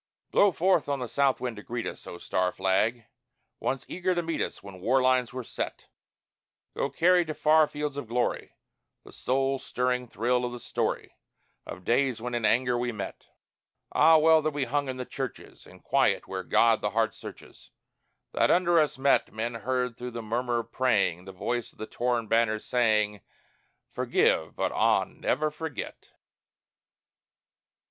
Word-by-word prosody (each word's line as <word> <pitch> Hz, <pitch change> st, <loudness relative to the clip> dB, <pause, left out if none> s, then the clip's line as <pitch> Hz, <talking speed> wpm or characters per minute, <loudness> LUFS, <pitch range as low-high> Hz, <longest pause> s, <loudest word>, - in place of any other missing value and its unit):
Blow 205 Hz, -, +5 dB
forth 180 Hz, -3 st, +2 dB
on 140 Hz, -, 0 dB
the 125 Hz, -2 st, -4 dB
south 135 Hz, +3 st, +1 dB
wind 125 Hz, -3 st, -4 dB
to -, -, -7 dB
greet 120 Hz, +2 st, -5 dB
us, -, -, -7 dB
O 85 Hz, -, -7 dB
star 90 Hz, +1 st, -1 dB
flag! 105 Hz, +6 st, 0 dB, 0.5 s
once 135 Hz, -1 st, -2 dB
eager 185 Hz, 0 st, -1 dB
to 175 Hz, -, 0 dB
meet 165 Hz, -1 st, -2 dB
us -, -, -4 dB
When 100 Hz, -2 st, -10 dB
war 130 Hz, +7 st, +3 dB
lines 130 Hz, -2 st, +2 dB
were 130 Hz, 0 st, -5 dB
set. -, -, -5 dB, 0.9 s
Go -, -, -1 dB
carry 180 Hz, +1 st, +4 dB
to 155 Hz, -2 st, -6 dB
far 155 Hz, 0 st, +4 dB
fields 145 Hz, -1 st, -4 dB
of 145 Hz, -, -5 dB
glory 120 Hz, +2 st, -2 dB, 0.5 s
The -, -, -15 dB
soul 135 Hz, +1 st, 0 dB
stirring 125 Hz, 0 st, -1 dB
thrill 120 Hz, +3 st, 0 dB
of 125 Hz, 0 st, -3 dB
the 125 Hz, -, -7 dB
story, -, -, -3 dB, 0.5 s
Of 90 Hz, -, -8 dB
days 130 Hz, -1 st, +1 dB
when 120 Hz, +2 st, -5 dB
in 120 Hz, -2 st, 0 dB
anger 125 Hz, +2 st, +2 dB
we 120 Hz, 0 st, -1 dB
met. 105 Hz, -3 st, -7 dB, 0.6 s
Ah, 160 Hz, +2 st, +6 dB
well 160 Hz, 0 st, +5 dB
that 155 Hz, -, 0 dB
we 145 Hz, -, 0 dB
hung 140 Hz, +2 st, -1 dB
in 130 Hz, -, -4 dB
the 125 Hz, -, -4 dB
churches 135 Hz, -1 st, -7 dB
In -, -, -16 dB
quiet, -, -, +1 dB
where 95 Hz, -1 st, -4 dB
God 115 Hz, +4 st, +3 dB
the 105 Hz, -, 0 dB
heart 110 Hz, -1 st, 0 dB
searches, -, -, -12 dB, 0.6 s
That -, -, +2 dB
under 175 Hz, -1 st, +4 dB
us 150 Hz, -3 st, +1 dB
met 135 Hz, +1 st, +2 dB
Men 115 Hz, +2 st, -3 dB
heard 125 Hz, +1 st, -2 dB
through 125 Hz, 0 st, -4 dB
the 115 Hz, -, -5 dB
murmur 120 Hz, +2 st, -1 dB
of 115 Hz, 0 st, -18 dB
praying 100 Hz, -9 st, +1 dB
The 95 Hz, -, -8 dB
voice 120 Hz, +5 st, -3 dB
of -, -, -29 dB
the 110 Hz, -, -5 dB
torn 120 Hz, 0 st, -1 dB
banners 110 Hz, -1 st, +1 dB
saying, 105 Hz, -4 st, +1 dB, 0.7 s
"Forgive, 80 Hz, -, +1 dB
but -, -, -1 dB
ah, -, -, +3 dB
never 155 Hz, 0 st, -1 dB
forget." 150 Hz, -2 st, -7 dB
125 Hz, 175 wpm, -27 LUFS, 115-140 Hz, 0.9 s, Ah